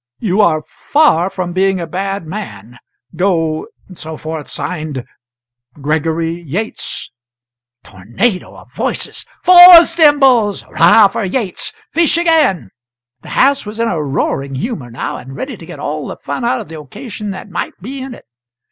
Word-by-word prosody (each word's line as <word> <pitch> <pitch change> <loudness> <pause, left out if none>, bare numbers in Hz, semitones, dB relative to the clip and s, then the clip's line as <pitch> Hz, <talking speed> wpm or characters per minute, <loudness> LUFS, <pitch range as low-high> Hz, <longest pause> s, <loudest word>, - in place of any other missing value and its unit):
'You 205 -1 +1
are 155 -6 +2
far 195 - +1
from 180 -2 -4
being 190 0 +1
a 170 - -3
bad 195 +2 -4
man. 125 - -8 0.4
Go,' 165 -3 0 0.2
etc. 160 -3 -7
Signed, 155 -6 -5 0.7
'Gregory 160 +3 -1
Yates.'" 175 +8 -5 0.7
Tornado 120 - -3
of - - -17
Voices. - - -4 0.2
"Four 355 -1 +10
Symbols!" 270 - +3
"'Rah 200 +5 +6
for 205 - -4
Yates!" 195 0 -2 0.2
"Fish 335 0 +2
again!" 310 - +2 0.5
The - - -12
house 275 +1 +2
was 210 +1 -7
in 230 0 0
a 160 - -1
roaring 140 -1 -2
humour 140 - -4
now, 115 - -5
and 135 +2 -10
ready 260 - -5
to - - -12
get - - -9
all - - -4
the - - -7
fun - - -5
out 245 +2 0
of 215 - -10
the 160 -1 -9
occasion 210 - -8
that 195 +1 -8
might 175 - -5
be 260 +8 -7
in 260 -2 -7
it. - - -17
185 Hz, 150 wpm, -15 LUFS, 155-235 Hz, 0.7 s, Four